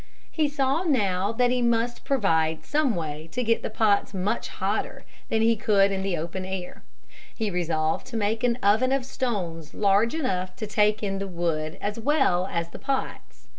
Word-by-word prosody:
He 305 Hz, -2 st, +1 dB
saw 275 Hz, +2 st, +1 dB
that 225 Hz, -, +1 dB
he 250 Hz, 0 st, +1 dB
must 235 Hz, 0 st, 0 dB
provide 160 Hz, -, +1 dB
some 290 Hz, -6 st, +1 dB
way 155 Hz, -1 st, -5 dB
to 250 Hz, -, -1 dB
get 230 Hz, 0 st, +2 dB
the -, -, -3 dB
pots 210 Hz, -2 st, +1 dB
much 195 Hz, +5 st, -1 dB
hotter -, -, -3 dB, 0.2 s
than 220 Hz, 0 st, +2 dB
he 230 Hz, 0 st, +4 dB
could 200 Hz, -2 st, +3 dB
in 190 Hz, -1 st, -1 dB
the 190 Hz, -3 st, -1 dB
open 170 Hz, +4 st, -4 dB
air. 185 Hz, -1 st, -6 dB, 0.5 s
He 220 Hz, -3 st, -2 dB
resolved 160 Hz, -3 st, -1 dB
to 240 Hz, -3 st, -4 dB
make 220 Hz, +2 st, 0 dB
an 240 Hz, -1 st, +2 dB
oven 220 Hz, +6 st, +4 dB
of 270 Hz, -2 st, +1 dB
stones 180 Hz, -, -3 dB
large 205 Hz, +5 st, +3 dB
enough 185 Hz, -, -2 dB
to 215 Hz, -, -4 dB
take 210 Hz, 0 st, +2 dB
in 195 Hz, -1 st, -1 dB
the 195 Hz, -, -3 dB
wood 165 Hz, -3 st, -2 dB
as 210 Hz, +2 st, -3 dB
well 230 Hz, -, +2 dB
as 170 Hz, -2 st, -2 dB
the -, -, -10 dB
pots. 270 Hz, -1 st, -4 dB
205 Hz, 180 wpm, -26 LUFS, 180-240 Hz, 0.5 s, he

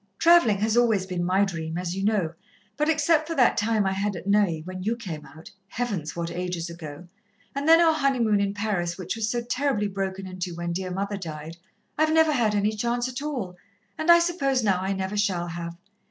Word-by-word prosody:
"Travelling 335 Hz, -12 st, +5 dB
has 220 Hz, +1 st, +1 dB
always 225 Hz, -6 st, +3 dB
been 180 Hz, -2 st, -3 dB
my 190 Hz, +3 st, +3 dB
dream, 165 Hz, -3 st, -4 dB
as 180 Hz, 0 st, -3 dB
you 195 Hz, -, -3 dB
know, 200 Hz, -6 st, +1 dB, 0.4 s
but 300 Hz, +2 st, 0 dB
except 310 Hz, 0 st, +2 dB
for 330 Hz, -, -3 dB
that 250 Hz, -5 st, +4 dB
time 215 Hz, -1 st, +1 dB
I 190 Hz, -, +1 dB
had 200 Hz, +1 st, -1 dB
at 175 Hz, -, -8 dB
Neuilly, 200 Hz, -5 st, +2 dB
when 185 Hz, +2 st, -7 dB
you 220 Hz, +5 st, 0 dB
came 175 Hz, -10 st, -7 dB
out 160 Hz, +2 st, -13 dB, 0.2 s
Heavens, 200 Hz, -9 st, -3 dB
what 170 Hz, 0 st, -3 dB
ages 175 Hz, -1 st, -4 dB
ago! 165 Hz, 0 st, -9 dB, 0.5 s
and 280 Hz, +2 st, -3 dB
then 330 Hz, +1 st, +8 dB
our 330 Hz, -2 st, +5 dB
honeymoon 250 Hz, -9 st, +2 dB
in 200 Hz, 0 st, -1 dB
Paris, 195 Hz, -5 st, -2 dB
which 185 Hz, +1 st, -4 dB
was 220 Hz, -1 st, -1 dB
so 240 Hz, +1 st, -1 dB
terribly 250 Hz, -3 st, 0 dB
broken 195 Hz, -1 st, -4 dB
into 185 Hz, -2 st, -5 dB
when 170 Hz, 0 st, -3 dB
dear 185 Hz, +1 st, -3 dB
mother 200 Hz, +2 st, -3 dB
died, 160 Hz, -2 st, -7 dB, 0.4 s
I've 310 Hz, 0 st, +3 dB
never 320 Hz, -1 st, +4 dB
had 230 Hz, -7 st, +1 dB
any 205 Hz, +1 st, +2 dB
chance 240 Hz, +3 st, -1 dB
at 255 Hz, +1 st, -5 dB
all, 245 Hz, -12 st, -4 dB, 0.4 s
and 315 Hz, +2 st, -3 dB
I 340 Hz, -, +10 dB
suppose 280 Hz, -7 st, +1 dB
now 190 Hz, -4 st, +2 dB
I 190 Hz, +1 st, -1 dB
never 190 Hz, +1 st, -3 dB
shall 190 Hz, -4 st, +1 dB
have. 170 Hz, 0 st, -6 dB
200 Hz, 210 wpm, -25 LUFS, 180-245 Hz, 0.5 s, I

